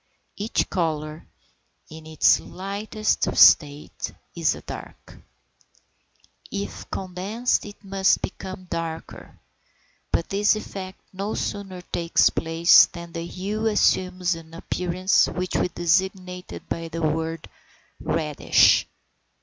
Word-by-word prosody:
Each 210 +3 -1
colour, 155 -3 -3 0.6
in 160 0 -11
its 160 0 +4
lightest 200 +4 -2
state, 145 -1 +4 0.2
is - - +1
a - - -10
dark; - - -10 1.3
if 200 0 -6
condensed 195 +7 -2
it 205 +1 -13
must 195 -1 +2
become 185 0 -6
darker, 165 -2 -6 0.7
but 170 - 0
this 205 +2 +2
effect 190 -3 -7
no 200 +3 -3
sooner 195 -3 -4
takes 170 -1 +2
place 165 +1 +6
than 170 -1 -10
the 165 0 -5
hue 205 +5 -3
assumes 185 -4 +2
an 165 0 -10
appearance 180 +2 +1
which 180 0 -3
we - - +2
designate 180 +1 -1
by 165 0 -4
the 165 0 -5
word 160 +1 -2 0.5
reddish. 150 -3 +3
180 Hz, 110 wpm, -24 LUFS, 165-195 Hz, 1.3 s, place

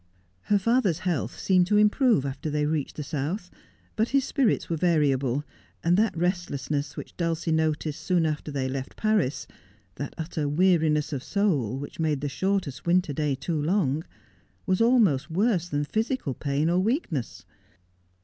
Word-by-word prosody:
Her 205 - +3
father's 210 -4 +2
health 145 -10 -1
seemed 185 -2 +3
to 210 +1 +3
improve 210 - +4
after 140 +3 -4
they 150 0 0
reached 150 -2 -2
the 150 - -4
South, 160 +7 -3 0.4
but 220 +2 +1
his 275 -1 +2
spirits 265 -6 +1
were 165 - -1
variable, 145 -5 +1 0.4
and 170 +1 +3
that 210 -3 +1
restlessness 150 -5 -2
which - - -8
Dulcie 165 -1 -1
noticed 155 -1 0
soon 175 -3 +1
after 155 -1 -2
they 135 -2 -2
left 130 0 -5
Paris— 215 -11 +1 0.5
that - - -5
utter 155 -2 -2
weariness 155 -2 +2
of 135 - -2
soul 150 - 0
which 145 +4 -8
made 155 -3 0
the 145 - -2
shortest 190 -3 -2
winter 180 -3 +2
day 150 -1 0
too 155 +2 -2
long 160 -3 +1 0.3
— - - -37
was_ 185 +3 +2
almost 215 - +3
worse 180 0 +1
than 145 0 0
physical 220 - -1
pain 140 +3 -1
or 175 +2 +2
weakness. 190 - -2
160 Hz, 160 wpm, -26 LUFS, 145-190 Hz, 0.5 s, improve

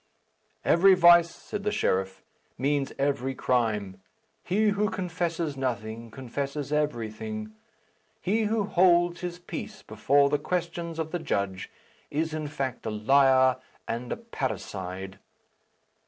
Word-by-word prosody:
"Every 190 +3 +6
vice," 170 -1 +7
said 205 - -7
the 210 +1 -1
sheriff, 95 - -1 0.3
"means 140 +1 0
every 135 -1 0
crime. 105 -8 0 0.4
He 210 +4 +2
who 205 +1 +1
confesses 170 -4 -2
nothing, 115 -3 -3
confesses 140 +4 -4
everything. 150 - -2 0.7
He 220 +2 +1
who 215 0 +1
holds 175 -2 +3
his 175 -1 -4
peace 175 - -7
before 140 +1 +2
the 145 - +2
questions 170 0 -3
of 160 -1 -3
the 175 - -2
judge 100 - -2 0.4
is 160 +2 -1
in 155 -1 -3
fact 135 -4 -4
a - - 0
liar 130 +4 +4 0.3
and 120 +1 -4
a - - -2
parricide." 95 - -5
145 Hz, 125 wpm, -27 LUFS, 120-175 Hz, 0.7 s, vice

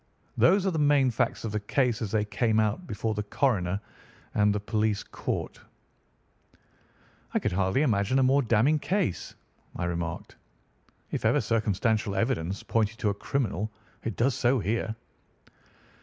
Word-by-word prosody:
Those 195 0 +4
are 190 - +2
the 160 - -1
main 145 -3 +4
facts 110 - -1
of 110 - -3
the 105 - -1
case 120 +3 0
as 110 - -2
they 105 -1 +1
came 110 +1 +1
out 110 - 0
before 110 +1 -2
the 105 - -2
coroner 100 -4 0 0.5
and 105 0 +3
the 105 - 0
police 105 0 0
court." - - -4 1.8
"I - - +5
could - - 0
hardly 95 +9 +1
imagine 110 -1 +2
a 135 - +4
more 135 +2 +4
damning 125 +6 +3
case," 185 - -1 0.4
I - - -3
remarked. 85 -1 -4 0.7
"If - - -3
ever 145 - +3
circumstantial 110 -2 0
evidence 100 -4 -1
pointed 115 -1 0
to 105 - 0
a - - 0
criminal 105 -2 -2 0.3
it 115 - -3
does 130 +3 +2
so 125 +2 +2
here." 110 +1 -1
110 Hz, 155 wpm, -28 LUFS, 100-130 Hz, 1.8 s, I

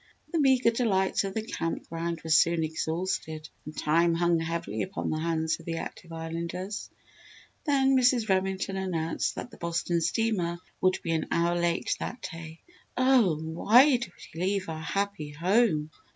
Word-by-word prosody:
The 335 - +1
meagre 260 -4 +4
delights 205 -6 +1
of 195 - -5
the 220 - -1
Camp 165 -6 -3
Ground 165 0 -3
were 160 - -4
soon 165 +1 +4
exhausted 160 0 -3 0.2
and 155 - -9
time 165 +2 +3
hung 170 0 +2
heavily 165 -10 -3
upon 190 - -3
the 155 - -1
hands 160 -1 0
of - - -15
the 165 0 -2
active 170 +1 -7
Islanders. 170 +4 -5 0.8
Then 270 -3 +3
Mrs. 250 -3 +3
Remington 190 0 0
announced 165 -4 -1
that 245 - -6
the - - -13
Boston 170 0 -1
steamer 175 -1 0 0.2
would 185 0 +3
be 165 - -1
an 160 -1 0
hour 170 +1 +2
late 170 -1 0
that 245 - -5
day. 165 0 -9 0.4
"Oh, 255 -9 +4
why 220 - +5
did 240 - -5 0.3
we 165 - -6
leave 190 -1 0
our 160 -1 -5
happy 195 -1 -2
home?" 170 -2 +2
170 Hz, 165 wpm, -28 LUFS, 165-200 Hz, 0.8 s, why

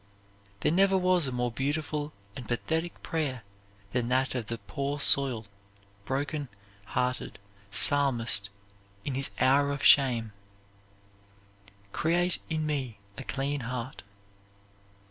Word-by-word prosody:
There - - +2
never 195 +2 +4
was 180 -4 +3
a - - -2
more 125 -1 -1
beautiful 145 +3 -2 0.2
and 125 -4 -8
pathetic 160 +8 -2
prayer 140 -8 -2 0.5
than 125 -2 0
that 130 +1 +1
of 120 -4 -3
the 115 - -3
poor 140 +4 -3
soiled, 130 -6 +3 0.6
broken 145 +2 -2 0.4
hearted 125 +5 -2 0.3
Psalmist 115 -2 +3 0.6
in 140 - -2
his 135 +1 -1
hour 140 +2 +4
of 140 0 -4
shame, 120 -6 +5 1.6
"Create 175 - +1
in 155 -1 -1
me 135 -8 -2 0.2
a - - -7
clean 140 +1 -2
heart." 125 +1 -5
135 Hz, 115 wpm, -29 LUFS, 125-150 Hz, 1.6 s, shame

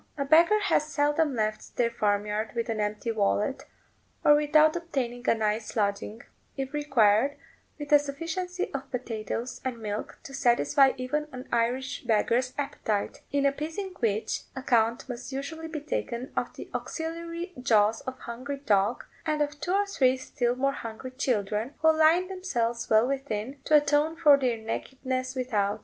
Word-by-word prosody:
A 280 - -1
beggar 335 +8 +5
has 305 -6 +2
seldom 295 -1 +1
left 215 -1 -3
their 235 -1 +2
farm 205 -2 +1
yard 210 +1 -3
with 230 0 -2
an 220 -1 -1
empty 210 +2 -1
wallet, 210 +4 0 0.6
or 295 - +8
without 305 +1 +4
obtaining 255 -8 -2
a - - +5
night's 215 0 -1
lodging, 210 +1 -1 0.3
if 270 +1 -4
required, 270 -2 +3 0.4
with 290 -1 -7
a 295 - +8
sufficiency 335 +6 -4
of 275 -1 -5
potatoes 235 0 -4
and 255 -2 -3
milk 210 -2 -5
to 275 - -10
satisfy 270 +1 +4
even 295 +4 -2
an 255 0 -8
Irish 245 +3 0
beggar's 240 +2 +2
appetite; 220 -7 -2
in 280 0 +1
appeasing 320 +7 -2
which, 220 -2 -1
account 235 -3 +1
must 245 +1 -6
usually 315 +4 -5
be 315 -2 -5
taken 255 -4 -3
of - - -1
the - - -8
auxiliary 335 +2 -4
jaws 220 -3 +3
of 260 - -5
a - - -23
hungry 255 +4 -5
dog, 210 -4 +1 0.2
and 305 -1 +1
of 290 0 -5
two 350 - -2
or 405 +1 +3
three 265 -10 +2
still 245 -1 -1
more 275 +2 +1
hungry 230 +1 -7
children, 230 -1 -1
who 320 0 +6
line 320 +4 +4
themselves 240 -12 -2
well 220 +1 +5
within, 270 -1 -3
to 305 - +4
atone 295 +2 +2
for 305 -3 +7
their 255 -4 0
nakedness 255 +3 -4
without. 215 -6 0
260 Hz, 165 wpm, -28 LUFS, 230-295 Hz, 0.6 s, or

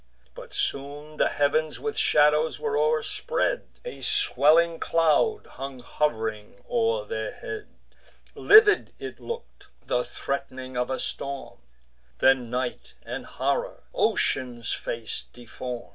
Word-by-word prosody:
But - - -11
soon 145 +2 -3
the - - +4
heav'ns 150 +2 +1
with 440 -1 -3
shadows 150 +1 +3
were 450 -1 -1
o'erspread; 475 +1 0 0.2
A 485 - -7
swelling 170 - +3
cloud 165 - +2
hung 135 -1 -8
hov'ring 110 -6 -2
o'er 485 0 +1
their 480 +2 -3
head: 430 -1 -6 0.7
Livid 420 0 +6
it - - -7
look'd, 470 0 -8 0.2
the 125 - +1
threat'ning 130 -1 -5
of 125 +1 0
a 130 - -1
storm: 140 0 -5 0.6
Then 130 -3 +4
night 125 +1 -3
and - - -6
horror - - -2
ocean's 120 -3 0
face 115 -1 -4
deform. 120 0 -7
150 Hz, 115 wpm, -26 LUFS, -, 0.7 s, Livid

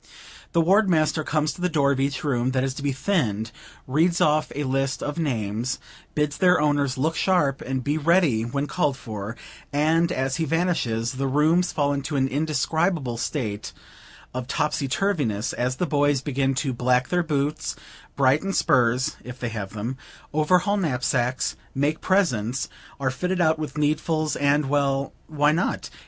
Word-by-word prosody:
The 170 - +4
ward 195 +5 +4
master 155 -1 +2
comes 155 0 0
to 180 - -11
the 180 - +1
door 145 -4 +2
of 135 - 0
each 135 0 -1
room 130 -3 0
that 130 -1 +1
is 135 -1 -1
to 140 - -7
be 140 0 0
thinned, 125 - -1 0.3
reads 165 +6 +2
off 155 0 +2
a 145 - -1
list 135 0 -1
of 145 +3 -3
names, 120 -4 -1 0.4
bids 150 -1 0
their 180 -1 +5
owners 145 -2 +1
look 160 +5 0
sharp 150 -8 +1
and 130 0 -3
be 145 +3 0
ready 160 -7 +3
when 140 +5 -2
called 145 -4 0
for; 110 -3 -6 0.3
and, 160 +4 +2
as 130 -2 -1
he 165 - 0
vanishes, 140 -9 0
the 135 +1 -2
rooms 155 +6 +3
fall 145 -1 +1
into 140 +2 -3
an 135 -1 +2
indescribable 155 -1 0
state 110 -5 -3 0.6
of 125 -1 -4
topsy 150 -1 0
turvyness, 135 - 0
as 125 +1 -1
the 180 - -1
boys 145 -3 +2
begin 135 -1 0
to 130 0 -1
black 125 +1 +1
their 180 0 +2
boots, 150 -2 -1 0.4
brighten 140 +8 +2
spurs, 125 -3 +2
if 125 +1 -9
they 120 - -2
have 105 -3 -5
them, 115 +5 -4 0.4
overhaul 180 +7 +3
knapsacks, 130 -6 0 0.2
make 145 +3 0
presents; 130 - +1 0.3
are 130 -1 0
fitted 180 +8 -2
out 160 -2 +3
with 150 -3 -5
needfuls, 155 +1 0
and 145 +1 +3
well, 140 -1 0
why 150 -1 +2
not? 170 +5 -1
145 Hz, 170 wpm, -24 LUFS, 130-155 Hz, 0.6 s, their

